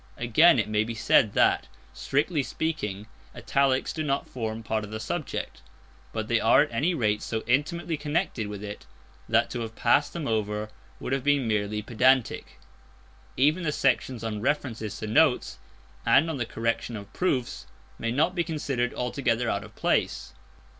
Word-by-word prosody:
Again, 130 +8 +5
it 110 - +1
may 105 0 +1
be 115 +1 -5
said 110 -2 +3
that, - - +3 0.3
strictly 145 - 0
speaking, 105 -10 -3 0.3
italics 135 -1 +1
do 160 - -3
not 140 -2 -1
form 115 -2 -4
part 110 0 -1
of 105 - -7
the 110 0 -5
subject. 140 +8 -4 0.5
But - - -3
they - - +2
are - - +5
at - - -7
any 150 +10 +1
rate 105 -6 +1
so 110 -1 -3
intimately 160 +6 0
connected 145 - -1
with 105 0 -7
it 105 0 -8 0.4
that - - +2
to - - -3
have 115 -1 -5
passed 145 +5 +2
them 170 -4 -4
over 105 -1 -1 0.3
would - - -3
have 135 -2 -1
been 145 -3 +2
merely 105 0 -1
pedantic. 125 +2 +1 0.8
Even 150 +7 +3
the 155 -3 0
sections 130 -3 0
on 105 -2 -3
references 115 -5 -2
to - - -5
notes 130 - +2 0.4
and 160 +3 +4
on 150 - -4
the 120 -3 -2
correction 115 +1 -2
of 100 -1 -9
proofs 125 - -1 0.3
may 115 - -2
not 155 +8 +2
be 175 -2 0
considered 140 -7 -2
altogether 125 -2 0
out 100 - -2
of 105 - -14
place. - - 0
120 Hz, 170 wpm, -27 LUFS, 110-145 Hz, 0.8 s, Again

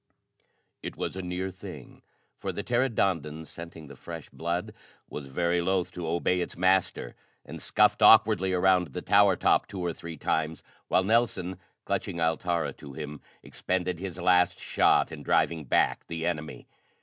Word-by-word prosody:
It - - -6
was - - -3
a 95 - -4
near 90 +1 -3
thing, 90 - -11 0.4
for - - -3
the 100 - -5
pteranodon, 95 - 0
scenting 85 -1 -10
the 70 -1 -12
fresh 80 +3 -9
blood, 85 +2 -3 0.3
was 70 -2 -7
very 85 +5 0
loath 95 0 0
to 85 -2 -6
obey 85 +2 +1
its - - -5
master, 95 +1 +1 0.3
and - - -9
scuffed - - +3
awkwardly 95 -4 +6
around 90 -1 +3
the - - -5
tower 100 -2 +5
top - - +2
two 100 - -7
or 85 -2 -2
three 85 -1 -9
times, 80 +1 -1 0.2
while 95 - +3
Nelson, 95 -4 +1 0.3
clutching 85 - -2
Altara 85 +1 0
to 70 -2 -11
him, 75 0 -7 0.2
expended 90 -2 -2
his 90 -2 -6
last 90 0 +3
shot - - +2
in - - -8
driving 80 -3 +1
back - - +1
the 80 -1 -4
enemy. 80 -3 -4
90 Hz, 160 wpm, -28 LUFS, 80-95 Hz, 0.4 s, awkwardly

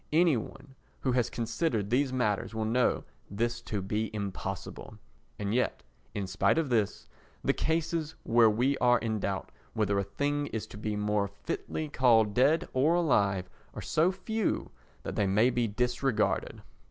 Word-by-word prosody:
Any 165 -1 +4
one 120 +4 -7 0.3
who 130 - +1
has 125 -1 +1
considered 115 - -1
these 130 +2 +2
matters 115 -4 -1
will 110 -1 -1
know 120 +3 +2 0.3
this 120 +3 -1
to 105 -4 -4
be 105 +3 -1
impossible. 100 -3 -5 0.4
And 105 0 -2
yet 125 +1 0 0.3
in 100 -2 -2
spite 95 +10 +2
of 160 -4 +1
this, 110 -5 0 0.4
the - - +3
cases 160 0 -1
where 115 -1 +5
we 125 +6 +2
are 120 0 +5
in 110 -2 -2
doubt 100 -1 -3 0.2
whether 100 -2 +1
a - - 0
thing 145 +8 -1
is 110 -5 -4
to - - -8
be 105 -1 -2
more 105 -1 0 0.2
fitly 155 - -3
called 115 -7 +4
dead 140 +8 +3
or 145 +6 +3
alive 100 - +2 0.3
are - - -5
so 165 +4 +2
few 210 +3 -2 0.3
that - - -5
they 100 - +2
may 110 +6 +4
be 120 -1 +1
disregarded. 125 +1 0
120 Hz, 165 wpm, -30 LUFS, 105-140 Hz, 0.4 s, where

